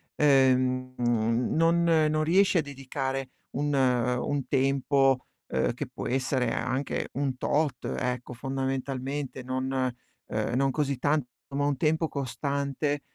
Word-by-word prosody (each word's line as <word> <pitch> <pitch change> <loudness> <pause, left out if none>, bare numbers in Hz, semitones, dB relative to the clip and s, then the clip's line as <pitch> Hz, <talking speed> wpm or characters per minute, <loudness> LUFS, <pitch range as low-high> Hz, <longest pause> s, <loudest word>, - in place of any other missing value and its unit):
ehm, 130 -2 +3
mhmm, 120 0 +1
non 165 +1 +4
non 155 -2 +3
riesci 185 +4 +4
a - - +4
dedicare 135 -1 -4 0.2
un 145 +2 -1
un 125 +1 +1
tempo, 135 -1 +2 0.2
uhm, 65 - 0
che - - -4
può 130 - -6
essere 130 -1 0
anche 130 +2 -2
un 135 -1 -1
tot, 150 +2 0
ecco 125 0 -3
fondamentalmente, 135 +1 -3
non 130 +1 -2 0.6
uhm, - - -2
non 135 +1 +2
così 140 -1 -1
tanto, 145 0 +1 0.2
ma 140 +1 -1
un 145 -2 0
tempo 160 +3 +2
costante 140 +1 -2
135 Hz, 130 wpm, -28 LUFS, 130-145 Hz, 0.6 s, non